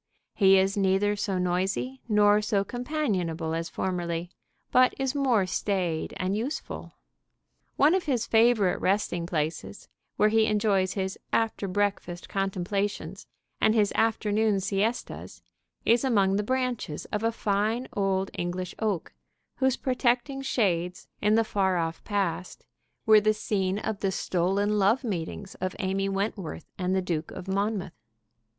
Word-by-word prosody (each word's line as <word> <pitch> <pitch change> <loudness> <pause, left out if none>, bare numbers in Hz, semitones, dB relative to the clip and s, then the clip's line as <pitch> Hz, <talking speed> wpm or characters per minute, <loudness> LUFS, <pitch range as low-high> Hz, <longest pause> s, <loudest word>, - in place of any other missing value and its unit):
He 195 -1 +5
is 190 +1 +2
neither 200 +1 +2
so 200 -2 -2
noisy 190 +8 -1
nor 210 0 +5
so 210 -2 +1
companionable 195 - -2
as 165 0 -2
formerly, 175 -1 -3 0.4
but 255 0 +5
is 270 -1 -1
more 255 -8 +2
staid 180 -3 -1
and 185 +2 -1
useful. 245 +8 -4 0.8
One 295 +4 +5
of 375 -1 +1
his 250 -7 0
favorite 225 -4 +3
resting 185 -3 0
places, 160 +3 -3 0.3
where 210 - +4
he 220 0 +3
enjoys 205 -3 +2
his 190 -1 -3
after 225 -3 0
breakfast 195 -3 -2
contemplations 195 +1 -2 0.3
and 220 +1 +4
his 210 -2 +3
afternoon 215 -2 +2
siestas, 200 +4 -2 0.4
is 235 +3 +4
among 200 -7 +3
the 205 - +2
branches 250 -8 -2
of 210 - -1
a 225 0 +1
fine 220 +3 0
old 195 -1 0
English 175 +1 -3
oak, 210 -6 -2 0.4
whose 265 -1 +2
protecting 255 +1 0
shades, 185 -10 -1
in 210 +1 +3
the 225 - +4
far 190 -4 +1
off 165 -1 -2
past, 185 -4 -2 0.4
were 215 -1 +7
the 215 +1 +2
scene 195 -2 -1
of 215 -1 -3
the 195 - 0
stolen 195 +4 0
love 210 +7 +3
meetings 190 -2 -4
of 185 0 -2
Amy 195 0 -1
Wentworth 195 -4 -3
and 185 0 0
the 190 - +1
Duke 165 -3 -2
of 180 - -8
Monmouth. 200 -1 -1
200 Hz, 140 wpm, -27 LUFS, 185-220 Hz, 0.8 s, were